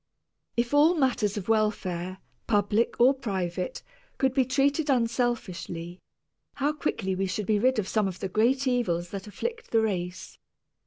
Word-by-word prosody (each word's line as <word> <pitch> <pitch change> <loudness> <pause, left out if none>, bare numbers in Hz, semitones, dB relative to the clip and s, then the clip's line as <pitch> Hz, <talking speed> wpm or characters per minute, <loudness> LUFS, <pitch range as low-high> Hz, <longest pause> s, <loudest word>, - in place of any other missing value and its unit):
If 235 +3 0
all 305 +4 +6
matters 250 - +1
of 195 - -5
welfare, 190 -5 0 0.3
public 210 +1 +1
or 250 +3 +6
private, 190 -8 -3 0.3
could 265 -2 +2
be 260 -1 +3
treated 280 +3 +1
unselfishly, 230 -8 -1 0.6
how 285 +2 0
quickly 220 -10 -2
we 190 +1 -1
should 200 +2 -3
be 210 +1 +2
rid 255 +3 +3
of 205 -3 -1
some 215 -1 +1
of 185 -1 -6
the 195 - -2
great 240 +8 +2
evils 180 -10 0
that 195 0 -6
afflict 460 - -5
the 225 - +3
race. 180 -4 -3
220 Hz, 155 wpm, -27 LUFS, 190-260 Hz, 0.6 s, all